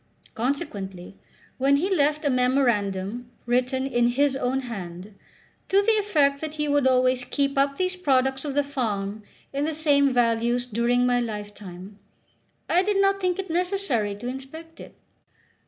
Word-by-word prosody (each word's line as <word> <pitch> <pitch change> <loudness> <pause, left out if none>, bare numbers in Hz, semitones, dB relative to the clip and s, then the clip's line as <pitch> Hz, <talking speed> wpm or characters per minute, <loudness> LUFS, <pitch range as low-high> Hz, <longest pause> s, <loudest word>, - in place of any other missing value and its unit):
Consequently, 200 - -4 0.4
when 275 +2 +4
he 375 +7 +1
left 300 0 +1
a 285 - +3
memorandum 240 -4 0 0.2
written 255 +2 0
in 240 -3 +2
his 270 +3 +2
own 265 0 -1
hand, 195 -5 -7 0.6
to 390 - +4
the 450 - +3
effect 290 -9 +2
that 310 -1 -5
he 300 -1 -1
would 285 -2 +2
always 255 0 +3
keep 280 +2 -1
up 275 0 +1
these 370 0 0
products 265 -6 +1
of 285 -2 -4
the 290 - +3
farm 215 -7 -3 0.3
in 280 +1 -1
the 315 0 -1
same 285 -3 +3
values 240 0 +1
during 245 +1 +1
my 245 0 +2
lifetime, 205 -3 -7 0.7
I 355 - +3
did 400 +1 0
not 395 0 +3
think 365 -1 0
it 385 -3 -4
necessary 345 - 0
to 210 +4 -7
inspect 295 +6 -8
it. - - -12
265 Hz, 155 wpm, -25 LUFS, 235-295 Hz, 0.7 s, when